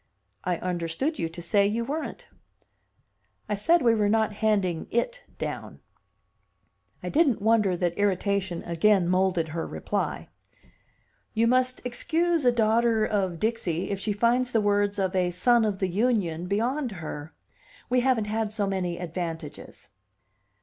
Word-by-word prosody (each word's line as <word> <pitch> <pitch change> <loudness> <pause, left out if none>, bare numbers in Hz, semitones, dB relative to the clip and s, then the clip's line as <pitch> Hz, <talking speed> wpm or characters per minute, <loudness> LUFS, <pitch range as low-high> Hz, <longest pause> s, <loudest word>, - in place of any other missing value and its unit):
"I 180 -1 0
understood 180 - -2
you 165 - -1
to 170 +1 -7
say 200 +3 +3
you 230 +3 -1
weren't." 305 +5 -5 1.2
"I - - -1
said 315 +10 +3
we 230 -2 +5
were 210 -2 +2
not 220 0 +2
handing 200 -6 0
'it' - - -1 0.2
down." - - -5 1.2
I - - -3
didn't 290 -7 +3
wonder 210 -4 +2
that 175 +1 -1
irritation 195 -2 0
again 175 +2 +3
moulded 180 -3 +1
her 165 +1 -3
reply. - - -3 1.1
"You 225 +1 +3
must 255 +1 +2
excuse 325 +5 0
a 245 - +6
daughter 225 -1 +2
of 190 -6 -1
Dixie 205 -6 -1
if 200 - -2
she 210 +2 -2
finds 240 +4 +2
the 225 - +4
words 205 0 +1
of 190 -1 -1
a 180 -1 +2
son 235 +7 +3
of 210 -3 0
the 190 - 0
Union 185 -4 0
beyond 240 +5 -1
her. 155 -2 -7 0.6
We 250 +1 +2
haven't 245 -4 +2
had 215 0 -2
so 215 -2 -1
many 185 -3 -2
advantages." 165 -3 -6
205 Hz, 145 wpm, -26 LUFS, 180-235 Hz, 1.2 s, a